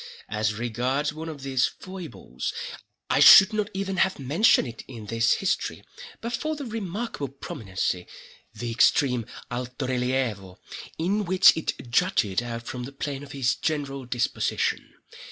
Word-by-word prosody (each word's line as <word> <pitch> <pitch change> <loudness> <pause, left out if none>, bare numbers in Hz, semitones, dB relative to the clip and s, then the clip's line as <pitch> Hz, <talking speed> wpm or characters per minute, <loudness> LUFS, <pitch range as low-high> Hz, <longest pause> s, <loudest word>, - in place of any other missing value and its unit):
As 110 0 0
regards 125 +6 -1
one 160 +1 -6
of 145 -4 -8
these 130 -2 +2
foibles, 180 - -7 0.6
I - - +3
should 195 +3 +10
not 210 -1 -1
even 195 0 -3
have 185 +1 +2
mentioned 145 - +3
it 115 -1 -8
in 115 -5 -9
this 115 +2 +2
history 195 - -1 0.4
but 235 +1 -4
for 310 +5 -2
the 290 -2 -6
remarkable 215 - -4
prominency—the 105 -1 -5
extreme 125 -1 +3 0.2
alto 125 +2 -4
relievo—in 130 - -2
which 185 +1 +6
it 130 -6 -4
jutted 120 - +2
out 115 -1 -5
from 125 +1 -5
the 135 - -8
plane 140 0 -4
of 140 -1 -10
his 130 -3 +1
general 140 -4 -3
disposition. 125 -1 -1
135 Hz, 135 wpm, -26 LUFS, 120-180 Hz, 0.6 s, should